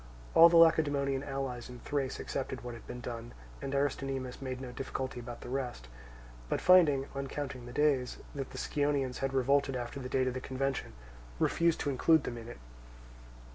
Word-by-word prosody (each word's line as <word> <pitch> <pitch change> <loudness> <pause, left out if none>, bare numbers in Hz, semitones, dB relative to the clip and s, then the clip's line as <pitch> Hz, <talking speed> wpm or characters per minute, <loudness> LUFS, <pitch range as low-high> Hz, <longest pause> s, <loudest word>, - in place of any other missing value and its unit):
All 165 +1 +9
the 170 - +5
Lacedaemonian 145 -4 +4
allies 135 -4 -4
in 125 - -9
Thrace 140 -3 -2
accepted 130 -1 -4
what 120 -1 -5
had 115 - -11
been 125 - -7
done; 120 -1 -6 0.3
and 135 - -3
Aristonymus 135 -2 -2
made 130 -1 -4
no 130 -2 -6
difficulty 130 0 -4
about 120 0 -8
the - - -8
rest, 125 - -4 0.6
but - - 0
finding, 155 -7 +6
on 140 0 -3
counting 135 -3 -5
the - - -8
days, 140 -2 +1 0.2
that 135 -2 -4
the - - -9
Scionaeans 145 -3 0
had 135 0 -1
revolted 135 +1 +2
after 125 +2 -4
the 125 -1 -6
date 130 0 +2
of 130 - 0
the 130 - -4
convention, 135 +1 -2 0.4
refused 170 - +2
to 145 - 0
include 160 +3 +4
them 120 -1 -4
in 115 - -10
it. - - -9
135 Hz, 185 wpm, -32 LUFS, 125-140 Hz, 0.6 s, All